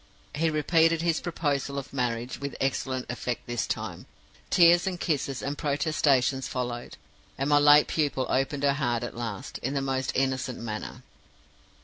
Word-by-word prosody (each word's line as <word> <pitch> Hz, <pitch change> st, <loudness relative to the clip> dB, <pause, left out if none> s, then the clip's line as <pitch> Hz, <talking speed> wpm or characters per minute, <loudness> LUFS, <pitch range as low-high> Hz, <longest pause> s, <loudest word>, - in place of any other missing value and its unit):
He 160 Hz, +2 st, +1 dB
repeated 165 Hz, +1 st, +3 dB
his 165 Hz, -2 st, +1 dB
proposal 145 Hz, -5 st, -2 dB
of 140 Hz, -, -6 dB
marriage, 125 Hz, -1 st, -2 dB
with 140 Hz, -1 st, -4 dB
excellent 130 Hz, -1 st, -1 dB
effect 125 Hz, 0 st, -4 dB
this 120 Hz, -1 st, -2 dB
time. -, -, -4 dB, 0.4 s
Tears 175 Hz, +1 st, +5 dB
and 180 Hz, -2 st, -2 dB
kisses 140 Hz, -6 st, -1 dB
and 140 Hz, +1 st, -2 dB
protestations 140 Hz, -3 st, +1 dB
followed; 120 Hz, -1 st, -4 dB, 0.4 s
and 135 Hz, -, -1 dB
my 145 Hz, 0 st, +5 dB
late 145 Hz, 0 st, +7 dB
pupil 145 Hz, -4 st, 0 dB
opened 135 Hz, +2 st, 0 dB
her 140 Hz, -1 st, +4 dB
heart 120 Hz, -5 st, -1 dB
at 120 Hz, -, -5 dB
last, 115 Hz, -4 st, -5 dB
in 135 Hz, +3 st, -3 dB
the -, -, +2 dB
most 135 Hz, -1 st, -1 dB
innocent 130 Hz, -2 st, 0 dB
manner. 110 Hz, -2 st, -6 dB
135 Hz, 155 wpm, -27 LUFS, 125-150 Hz, 0.4 s, late